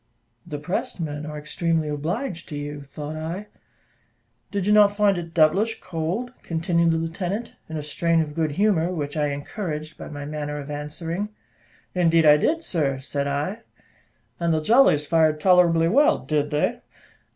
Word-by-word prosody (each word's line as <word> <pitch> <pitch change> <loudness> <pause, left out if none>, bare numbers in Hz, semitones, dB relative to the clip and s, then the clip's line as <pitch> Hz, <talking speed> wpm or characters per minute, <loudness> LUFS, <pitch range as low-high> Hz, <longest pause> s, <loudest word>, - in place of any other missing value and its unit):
"The 150 - -4
pressed 175 +5 -3
men 150 -2 -4
are 150 0 -6
extremely 160 +1 -1
obliged 170 - -3
to 150 - -5
you," 145 0 -5
thought 145 +2 -7
I. 165 +6 -4 1.0
"Did 200 -2 -2
you 210 - +4
not 205 -1 +6
find 205 -2 +4
it 170 -2 -5
devilish 190 +8 +3
cold?" 185 +9 -3
continued 170 0 +1
the 165 - +2
lieutenant, 180 +7 -3 0.2
in 160 - -4
a 150 - -4
strain 165 +3 +1
of 155 -2 -1
good 155 -2 -1
humour, 185 -2 +2
which 145 -5 -4
I 150 -1 +1
encouraged 155 +1 -5
by - - -7
my 145 -1 -6
manner 150 0 -4
of 145 0 -6
answering. 165 +7 -4 0.6
"Indeed 165 -2 +3
I 150 0 +8
did, 325 - +1
sir," 145 - 0
said 140 +1 -3
I. 145 +10 -2 0.8
"And 170 -1 +1
the 160 - +2
jollies 220 - +5
fired 155 -1 +3
tolerably 170 -2 +5
well, 280 - +4
did 150 -1 -1
they?" 150 0 0
160 Hz, 165 wpm, -24 LUFS, 150-180 Hz, 1.0 s, I